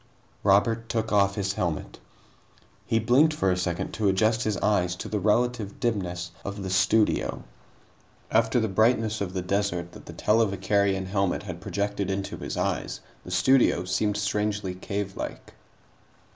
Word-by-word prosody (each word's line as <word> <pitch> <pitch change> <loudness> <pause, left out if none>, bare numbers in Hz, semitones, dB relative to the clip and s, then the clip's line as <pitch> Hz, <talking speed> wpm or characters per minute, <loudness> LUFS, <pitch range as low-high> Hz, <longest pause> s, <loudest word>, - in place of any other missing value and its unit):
Robert 115 +3 +3
took 110 -1 -1
off 100 -1 +3
his 95 -1 -1
helmet. 85 -5 -3 0.9
He 115 - +2
blinked 130 +8 +4
for 95 -10 +1
a - - +2
second 90 0 -2
to 105 -1 0
adjust 110 +4 +2
his 110 -2 0
eyes 90 -4 +1
to - - -6
the 105 - -1
relative 110 0 0
dimness 90 -6 -2
of 100 0 -5
the 95 - -4
studio. 105 +3 +2 0.9
After 115 +2 +3
the 110 - +1
brightness 110 +1 +2
of 95 -2 -3
the 90 - -1
desert 90 -3 -1
that - - -13
the - - -8
televicarion 100 -2 +1
helmet 95 0 0
had 90 -4 -7
projected 100 -1 -2
into 95 0 -3
his - - -5
eyes, - - -2 0.2
the - - -10
studio 95 0 +3
seemed 105 +3 0
strangely 105 -1 -1
cavelike. 100 +1 -5
100 Hz, 150 wpm, -26 LUFS, 95-110 Hz, 0.9 s, blinked